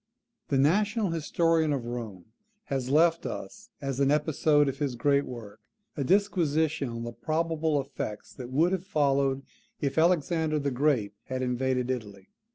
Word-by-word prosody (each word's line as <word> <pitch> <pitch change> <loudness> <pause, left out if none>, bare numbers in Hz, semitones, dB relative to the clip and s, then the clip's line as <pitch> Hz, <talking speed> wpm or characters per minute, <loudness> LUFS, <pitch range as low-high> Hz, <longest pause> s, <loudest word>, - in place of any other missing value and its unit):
The 140 - +1
national 205 - +2
historian 165 0 +1
of 135 -4 -2
Rome 115 -7 -6 0.5
has 130 -2 -1
left 165 +3 +3
us, 95 - -7
as 135 -2 -3
an 140 -1 +3
episode 150 0 +3
of 135 0 -3
his 140 -4 -1
great 140 +3 +2
work, 110 -4 -9 0.4
a 140 - -1
disquisition 160 -5 +1
on 115 0 -5
the 120 - -5
probable 160 -1 0
effects 130 -6 -6
that 125 -2 -8
would 160 +7 +2
have 190 -2 -1
followed, 140 -5 +1 0.4
if 140 +2 0
Alexander 160 -2 +2
the 140 -1 -1
Great 125 -6 +1
had 130 0 -3
invaded 125 0 0
Italy. 105 -6 -6
140 Hz, 155 wpm, -28 LUFS, 125-160 Hz, 0.5 s, left